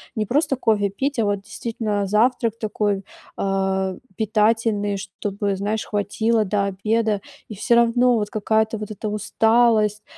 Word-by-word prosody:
не 215 -2 -1
просто 275 +5 +1
кофе 210 -5 +1
пить, 275 +8 -2
а 225 - +2
вот, 205 -1 0
действительно, 210 0 -3
завтрак 230 +1 +2
такой, 205 -2 -1 0.3
а, 190 -1 0 0.2
питательный, 215 -1 +1
чтобы, 200 +1 -3
знаешь, 210 +3 -2
хватило 220 +2 0
до 200 0 0
обеда, 210 +2 0 0.3
и 215 - -8
всё 235 +4 +2
равно, 240 +1 +4
вот, 210 -2 -1
какая-то, 220 +1 0
вот 210 0 -6
эта 215 +1 -5
усталость. 215 0 +2
215 Hz, 140 wpm, -22 LUFS, 200-225 Hz, 0.3 s, равно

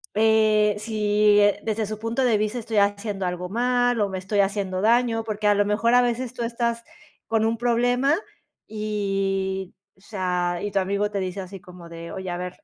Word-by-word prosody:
eh, 215 -1 +3
si 210 -1 +2 0.3
desde 220 0 -1
su 215 +1 -6
punto 230 +4 -1
de 225 -4 +3
vista 215 +3 -1
estoy 225 -2 -3
haciendo 200 -1 0
algo 180 0 -4
mal 245 +1 +1
o 200 - +1
me 190 - -4
estoy 195 +2 -2
haciendo 195 -2 0
daño, 230 0 +2
porque 215 -1 -4
a 205 - +5
lo 205 - +2
mejor 215 +4 +1
a 245 - +6
veces 245 0 -1
tú 250 - -7
estás 235 0 -2 0.4
con 225 -1 +1
un 225 +1 0
problema 245 +4 +2 0.5
y, 195 -3 -2 0.2
o 190 - -27
sea, 180 -4 -2
y 205 - -3
tu 195 - +1
amigo 200 +2 -1
te 200 - -2
dice 190 +1 -4
así 190 +1 -9
como 180 -3 -13
de: 170 0 -9
"Oye, 185 -1 -5
a 175 - -3
ver, 180 +9 -7
210 Hz, 195 wpm, -24 LUFS, 195-230 Hz, 0.5 s, a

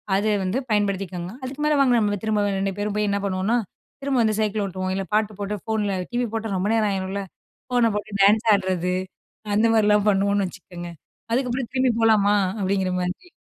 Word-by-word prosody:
அதை 210 +2 +1
வந்து 185 +7 -1
பயன்படுத்திக்கோங்க. 195 -3 -1
அதுக்கு 265 +3 -6
மேலே 300 - +3
வாங்க 255 -3 +4
நம்ம 205 -1 +1
திரும்ப 215 -1 +1 0.2
2 195 0 -1
பேரும் 210 0 -2
போய் 210 0 +1
என்ன 200 0 0
பண்ணுவோம்னா, 195 +5 0 0.4
திரும்ப 275 -2 0
வந்து 215 -1 +1
சைக்கிள் 210 -1 0
ஓட்டுவோம், 185 0 -3
இல்லை 195 0 -2
பாட்டு 215 0 +2
போட்டு 205 +1 -2
ஃபோனில 215 -3 -1 0.2
டிவி 245 0 0
போட்டா 225 -1 -2
ரொம்ப 195 +3 0
நேரம் 220 -2 +2
ஆயிரும்ல, 195 +1 -2 0.5
ஃபோனை 245 -2 +3
போட்டு 210 +1 -4
டான்ஸ் 215 +3 +5
ஆடுறது, 185 -2 0 0.6
அந்த 220 +2 +4
மாதிரிலாம் 210 -1 +3
பண்ணுவோம்னு 200 0 +1
வச்சுக்கோங்க. 175 -1 -9 0.4
அதுக்கப்புறம் 250 -1 -1
திரும்பி 255 -2 +3
போலாமா 210 -2 +4 0.2
அப்படிங்கிற 190 -1 0
மாதிரி. 180 - -4
205 Hz, 175 wpm, -23 LUFS, 195-225 Hz, 0.6 s, டான்ஸ்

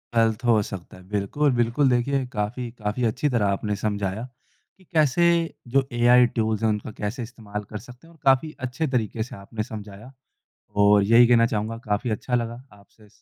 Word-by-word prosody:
गलत 115 +1 +2
हो 115 -3 +4
सकता 95 -1 -9
है। 90 - -15
बिल्कुल-बिल्कुल 120 +5 +1
देखिए 130 +2 +1
काफ़ी 115 +3 -3
काफ़ी 105 +4 -2
अच्छी 130 +6 -1
तरह 120 -5 +1
आपने 105 0 -2
समझाया 105 +2 -2 0.5
कि 190 - -22
कैसे 155 +1 +3 0.5
जो 135 -1 +4
एआई 125 +1 +6
टूल्स 110 -1 0
हैं 110 - +3
उनका 105 0 -2
कैसे 110 +5 -3
इस्तेमाल 105 -3 -7
कर 105 - -5
सकते 125 +8 -15
हैं - - -17
और 160 - -23
काफ़ी 135 +3 +3 0.2
अच्छे 155 +6 -2
तरीके 110 -1 -1
से 120 - -10
आपने 105 +2 -5
समझाया 105 +2 -9 0.7
और 100 0 +6
यही 115 +4 +6
कहना 115 -1 +5
चाहूँगा, 110 0 -2
काफ़ी 115 0 -2
अच्छा 125 +4 -2
लगा 120 0 -2
आपसे 105 +1 -21
115 Hz, 175 wpm, -24 LUFS, 105-125 Hz, 0.7 s, एआई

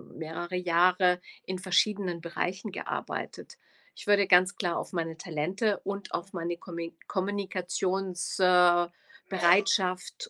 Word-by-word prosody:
mehrere 165 +3 -5
Jahre 180 +1 +3 0.3
in 185 - -3
verschiedenen 185 -1 +1
Bereichen 185 +5 -3
gearbeitet.“ - - -5 0.4
Ich - - -11
würde 200 -1 +4
ganz 185 +1 +5
klar 175 -3 -1
auf - - -5
meine 165 -2 -3
Talente 180 +6 -1
und 200 0 -5
auf 185 +3 -4
meine 170 -1 -3
Kommi 170 -1 -7
Kommunikations 190 -2 -2
äh, 180 -1 +5 0.4
Bereitschaft 185 - +2
180 Hz, 115 wpm, -29 LUFS, 175-195 Hz, 0.4 s, ganz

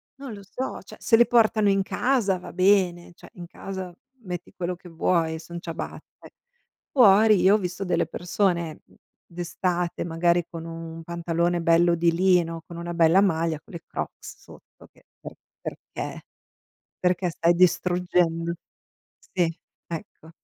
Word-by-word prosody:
non 270 -4 -8
lo 200 -1 -10
so, 255 +7 -5
cioè, - - -13
se 225 - +4
li 240 - +6
portano 215 -3 +4
in 195 0 +2
casa 225 -4 +1
va - - -10
bene, 185 -2 +2
cioè, - - -15
in 175 -1 -9
casa 185 0 -7 0.3
metti 175 -2 -6
quello 180 0 -3
che 175 0 -14
vuoi, 165 -1 0
son 170 +1 -8
ciabatte. 165 -2 -8 0.6
Fuori 215 -4 +6
io 195 +3 +6
ho - - +4
visto 185 +1 -4
delle 170 -1 +1
persone 175 -3 -1 0.4
d'estate, 175 0 -2
magari, 170 +1 +1
con 165 -1 -7
un 165 0 -7
pantalone 170 +1 -1
bello 170 +1 +4
di 170 0 +3
lino, 170 -2 +2
con 170 - -9
una 170 0 -5
bella 170 +3 +5
maglia, 165 -4 +1
con - - -18
le 170 - -8
Crocs - - -6
sotto, - - -17
che - - -26 0.2
per - - -8 0.3
perché? - - -7 0.8
Perché 180 0 +1
stai 170 +1 +2
distruggendo 175 -1 +2 0.7
Sì, 175 -3 -1 0.3
ecco. 165 -1 -8
175 Hz, 145 wpm, -25 LUFS, 170-190 Hz, 0.8 s, li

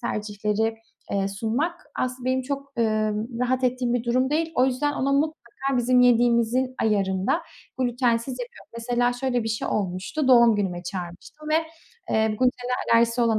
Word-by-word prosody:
tercihleri, 210 +1 -1 0.4
eee, 195 0 0
sunmak 240 - -2
aslında 255 0 -3
benim 260 0 +1
çok, 275 +1 -5
eee, 215 -2 +1 0.3
rahat 255 +1 +1
ettiğim 250 -1 0
bir 240 - -1
durum 255 +3 +1
değil. 325 +2 0
O 255 - +4
yüzden 285 +3 0
ona 275 0 0
mutlaka 310 +3 +1 0.4
bizim 250 +1 +3
yediğimizin 245 +1 +3
ayarında, 200 - +1 0.4
glutensiz 245 0 0
yapıyorum. 245 - -10
Mesela 245 +1 +1
şöyle 245 -1 -1
bir - - -2
şey 225 - -2
olmuştu, 200 - -2
doğum 235 -3 +6
günüme 180 -4 -2
çağırmıştım 180 - -7
ve, 310 - +2 0.6
eee, 220 0 +3
glutene 250 +2 0 0.2
alerjisi 230 +1 +3
olan 225 -2 +3
245 Hz, 150 wpm, -24 LUFS, 220-255 Hz, 0.6 s, doğum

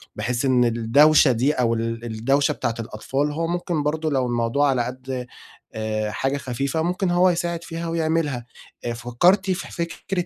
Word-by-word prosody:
بحيث 125 +2 -1
إن 125 -2 +4
الدوشة 130 +6 +5
دي 130 +6 +1
أو 120 -2 +1
ال 115 +1 -3
الدوشة 135 +7 +1
بتاعة 120 -4 -2
الأطفال 135 +6 -2
هو 165 +2 -2
ممكن 175 -3 -1
برضو 155 +1 -1
لو 130 -3 +1
الموضوع 120 +4 +1
على 125 -3 +1
قد 130 0 -5 0.5
آآ 110 -1 -2
حاجة 135 +5 -1
خفيفة 135 +4 -2
ممكن 180 +2 0
هو 180 +1 +4
يساعد 170 -1 -2
فيها 165 0 -5
ويعملها، 160 -6 -1 0.4
آآ 120 - -1
فكرتِ 125 - +2
في 180 - -4
فكرة 175 +2 -3
135 Hz, 165 wpm, -23 LUFS, 120-165 Hz, 0.5 s, الدوشة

